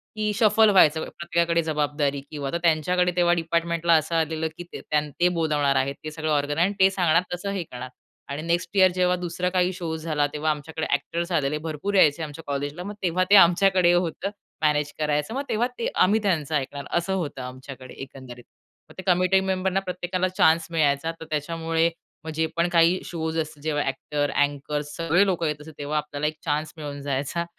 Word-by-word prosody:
की 215 -1 0
शफल 220 0 +5
व्हायचं 160 -5 +5
प्रत्येकाकडे 170 0 0
जबाबदारी 145 -2 -1
किंवा 140 -3 -4
तर 170 - 0
त्यांच्याकडे 180 +2 +2
तेव्हा 175 -1 +3
डिपार्टमेंटला 170 0 +1
असं 155 +2 -2
आलेलं, 160 0 0
की 175 - -6
त्यां 150 0 -2
ते, 175 +1 +4
बोलावणार 150 -3 +1
आहेत 135 +1 0
ते 155 - -5
सगळं 155 0 -3
ऑर्गन 145 0 0
आहे 170 - +4
आणि 205 - -4
ते 190 - +6
सांगणार 175 -3 +3
तसं 200 +3 -4
हे 195 -3 -2
करणार, 125 -4 -8 0.4
आणि 140 +2 -4
नेक्स्ट 170 +4 -2
ईअर 185 -1 +6
जेव्हा 180 0 +2
दुसरा 180 0 -2
काही 180 0 +1
शो 165 -3 -4
झाला, 155 -2 0
तेव्हा 155 +1 0
आमच्याकडे 155 +1 -4
एक्टर्स 170 +5 -4
आलेले, 150 -2 +1
भरपूर 160 +6 -4
यायचे 160 -3 +4
आमच्या 155 +1 -8
कॉलेजला, 145 +4 -3
मग 205 +2 -6
तेव्हा 185 +1 +2
ते 205 - +7
आमच्याकडे 185 -1 +5
होतं, 175 +2 0 0.3
मॅनेज 150 -1 +1
करायचं 150 +5 0
मग 275 - -1
तेव्हा 235 +3 +1
ते - - 0
आम्ही 205 +4 +3
त्यांचं 160 -6 0
ऐकणार 140 0 -3
असं 185 +3 -1
होतं 150 -8 -3
आमच्याकडे 130 0 -9
एकंदरीत. 130 -3 -10 0.5
मग - - -14
ते - - -5
कमिटी 185 +1 +4
मेंबरना 190 0 0
प्रत्येकाला 180 0 -2
चान्स 165 -3 +3
मिळायचा, 155 0 +1
तर 160 - -8
त्याच्यामुळे 165 +2 0 0.4
मग 160 - -5
जे 160 0 +1
पण 170 +1 +3
काही 170 +1 +4
शोज 160 -1 -3
असतात 155 -2 -5
जेव्हा 150 -2 0
एक्टर, 145 +2 -2
अँकर्स 145 +1 -1
सगळे 165 +4 +3
लोकं 175 -4 0
येत 150 0 -3
असतात, 155 +1 -11
तेव्हा 145 +1 -2
आपल्याला 150 0 -2
एक 155 0 -4
चान्स 150 +1 -1
मिळून 145 -2 -6
जायचा 140 +5 -2
160 Hz, 190 wpm, -24 LUFS, 150-180 Hz, 0.5 s, ते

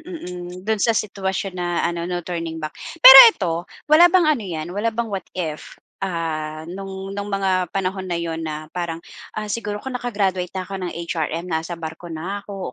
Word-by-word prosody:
mm. 180 - -8
Do'n 220 -1 0
sa 230 -2 +2
sitwasyon 195 -2 -2
na 175 -1 -1
ano, 170 0 -2
"No 175 -1 -3
turning 165 -2 -4
back". 155 -1 -5 0.3
Pero 265 +1 +14
ito, 180 - -1 0.3
wala 320 +4 +7
bang 360 -1 +4
ano 265 - -2
yan, 165 -5 -5
wala 205 +4 -1
bang 225 -1 -3
what 190 -3 -4
if, 155 -4 -5 0.2
ah, 160 -4 -3
nung 195 +2 -7
nung 200 0 -5
mga 190 -2 0
panahon 190 -1 -3
na 175 - -1
'yon 165 -1 -3
na 155 -1 -6
parang, 170 -2 -3 0.4
ah, 215 - -2
"siguro 210 0 -3
kung 265 +5 -7
naka-graduate 200 -7 -1
na 185 - -2
ko 195 - -12
ng 180 - -4
HRM, 165 0 -3
nasa 165 0 -3
barko 165 +1 -8
na 175 +5 -5
ko 195 -10 -6
185 Hz, 190 wpm, -21 LUFS, 170-205 Hz, 0.4 s, Pero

